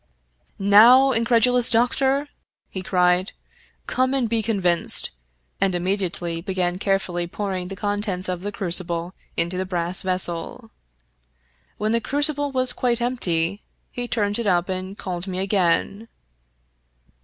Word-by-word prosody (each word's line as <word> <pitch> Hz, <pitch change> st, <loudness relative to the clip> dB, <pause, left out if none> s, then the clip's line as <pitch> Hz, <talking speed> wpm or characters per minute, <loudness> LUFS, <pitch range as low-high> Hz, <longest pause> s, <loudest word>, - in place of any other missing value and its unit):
" -, -, -43 dB
Now, 230 Hz, +7 st, +6 dB
incredulous 235 Hz, +1 st, +2 dB
doctor! 265 Hz, +4 st, +2 dB, 0.2 s
" -, -, -55 dB
he 190 Hz, -, -5 dB
cried, 180 Hz, +1 st, +1 dB, 0.3 s
" -, -, -33 dB
come 260 Hz, +1 st, 0 dB
and 255 Hz, -4 st, 0 dB
be 225 Hz, 0 st, 0 dB
convinced," 190 Hz, -6 st, +1 dB, 0.5 s
and 195 Hz, -2 st, +1 dB
immediately 175 Hz, -2 st, -1 dB
began 180 Hz, -1 st, -2 dB
carefully 190 Hz, -3 st, -1 dB
pouring 185 Hz, -1 st, -4 dB
the 195 Hz, -, -7 dB
contents 205 Hz, -2 st, -2 dB
of 180 Hz, -1 st, -4 dB
the 205 Hz, +2 st, -4 dB
crucible 175 Hz, -2 st, -1 dB, 0.2 s
into 170 Hz, +2 st, -1 dB
the -, -, -1 dB
brass 175 Hz, 0 st, +1 dB
vessel. 185 Hz, +4 st, -2 dB, 1.1 s
When 215 Hz, +1 st, -1 dB
the 230 Hz, 0 st, +1 dB
crucible 290 Hz, +2 st, +1 dB
was 255 Hz, -1 st, 0 dB
quite 245 Hz, -2 st, -1 dB
empty 200 Hz, -7 st, +2 dB, 0.3 s
he 245 Hz, 0 st, -5 dB
turned 205 Hz, -2 st, -1 dB
it 230 Hz, -, -2 dB
up 180 Hz, -1 st, +1 dB
and 185 Hz, +1 st, -5 dB
called 180 Hz, 0 st, -5 dB
me 185 Hz, -1 st, -5 dB
again. 195 Hz, +2 st, 0 dB
195 Hz, 140 wpm, -22 LUFS, 180-230 Hz, 1.1 s, Now